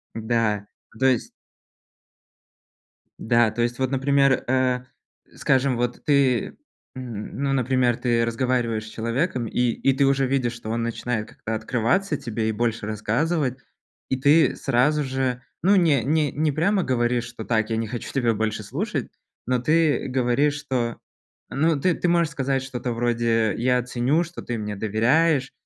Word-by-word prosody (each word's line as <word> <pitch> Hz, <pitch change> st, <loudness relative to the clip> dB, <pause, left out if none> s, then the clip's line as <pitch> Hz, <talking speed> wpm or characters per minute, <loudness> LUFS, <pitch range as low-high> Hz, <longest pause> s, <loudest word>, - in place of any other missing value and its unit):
Да, 110 Hz, -2 st, 0 dB, 0.3 s
то 130 Hz, -, +4 dB
есть 130 Hz, -3 st, +1 dB, 1.9 s
Да, 115 Hz, -1 st, +3 dB
то 120 Hz, +2 st, -3 dB
есть 120 Hz, +1 st, -1 dB
вот, 130 Hz, 0 st, 0 dB
например, 135 Hz, 0 st, +2 dB
э, 130 Hz, 0 st, +1 dB, 0.5 s
скажем, 130 Hz, -1 st, +1 dB
вот 120 Hz, 0 st, -2 dB
ты, 140 Hz, -4 st, +2 dB, 0.4 s
м, 120 Hz, -5 st, -7 dB
ну, 135 Hz, -1 st, +1 dB
например, 130 Hz, -2 st, +1 dB
ты 120 Hz, -2 st, +1 dB
разговариваешь 115 Hz, -2 st, -1 dB
с -, -, -9 dB
человеком, 120 Hz, +3 st, -2 dB
и -, -, -4 dB
и 135 Hz, +4 st, +1 dB
ты 140 Hz, +1 st, +2 dB
уже 135 Hz, 0 st, +2 dB
видишь, 130 Hz, -2 st, 0 dB
что 120 Hz, -2 st, -8 dB
он 115 Hz, +1 st, -1 dB
начинает 115 Hz, -1 st, -3 dB
как-то 110 Hz, -, -5 dB
открываться 130 Hz, -, 0 dB
тебе 115 Hz, -4 st, -3 dB
и -, -, +1 dB
больше 115 Hz, 0 st, -1 dB
рассказывать, 130 Hz, +6 st, -1 dB, 0.5 s
и 130 Hz, -, 0 dB
ты 150 Hz, +4 st, +4 dB
сразу 145 Hz, +3 st, +1 dB
же, 130 Hz, -2 st, -2 dB, 0.2 s
ну, 195 Hz, +3 st, +4 dB
не 155 Hz, -, +3 dB
не 150 Hz, +1 st, +1 dB
не 155 Hz, +1 st, 0 dB
прямо 185 Hz, +7 st, +1 dB
говоришь, 120 Hz, -2 st, 0 dB
что: 120 Hz, -1 st, -8 dB
"Так, 110 Hz, -1 st, 0 dB
я 115 Hz, -, -1 dB
не 115 Hz, -1 st, -2 dB
хочу 120 Hz, +1 st, -6 dB
тебя 120 Hz, -4 st, +1 dB
больше 110 Hz, 0 st, -2 dB
слушать", 100 Hz, -, -3 dB, 0.4 s
но 125 Hz, 0 st, +1 dB
ты 155 Hz, +3 st, +2 dB
говоришь, 130 Hz, +3 st, +1 dB
что, 125 Hz, -5 st, -2 dB, 0.5 s
ну, 155 Hz, +1 st, +1 dB
ты, 180 Hz, +5 st, +2 dB
ты -, -, -1 dB
можешь 170 Hz, -2 st, +2 dB
сказать 135 Hz, -2 st, -1 dB
что-то 125 Hz, -2 st, -4 dB
вроде: 115 Hz, -2 st, +1 dB
"Я 125 Hz, +1 st, +2 dB
ценю, 125 Hz, +7 st, +1 dB
что 170 Hz, +1 st, -9 dB
ты 120 Hz, -, -4 dB
мне 105 Hz, -1 st, -4 dB
доверяешь, 130 Hz, +8 st, +2 dB
125 Hz, 160 wpm, -24 LUFS, 115-140 Hz, 1.9 s, то